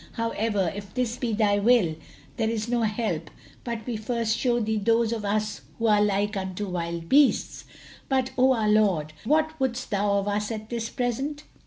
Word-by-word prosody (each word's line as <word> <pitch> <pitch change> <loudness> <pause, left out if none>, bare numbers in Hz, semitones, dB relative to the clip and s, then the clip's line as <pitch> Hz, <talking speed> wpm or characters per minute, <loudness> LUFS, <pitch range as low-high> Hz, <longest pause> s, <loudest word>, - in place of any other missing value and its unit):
However, 220 -5 -1
if 200 0 -9
this 245 -2 -1
be 245 -2 -2
thy 205 -1 +2
will, 205 -7 +3 0.4
there 220 -2 +1
is 225 -1 -2
no 240 0 +1
help 210 -8 -1 0.3
but 230 -3 -4
we 240 -3 -3
first 225 0 -1
show 240 0 +1
thee 220 -1 0
those 230 +2 +2
of 220 -2 -4
us 210 +1 -1 0.2
who 230 - -2
are 210 -2 +4
like 205 +1 +1
unto 190 +1 -3
wild 170 -1 -4
beasts. 280 +4 +3 0.4
But, 260 -1 +1
O 260 +1 +5
our 220 -3 0
lord, 195 -8 +2
what 315 +4 +1
wouldst 255 -2 -2
thou 200 0 +1
of 200 0 -1
us 205 0 -1
at 215 0 -6
this 230 -1 -2
present?" 270 +4 -2
220 Hz, 185 wpm, -26 LUFS, 205-240 Hz, 0.4 s, O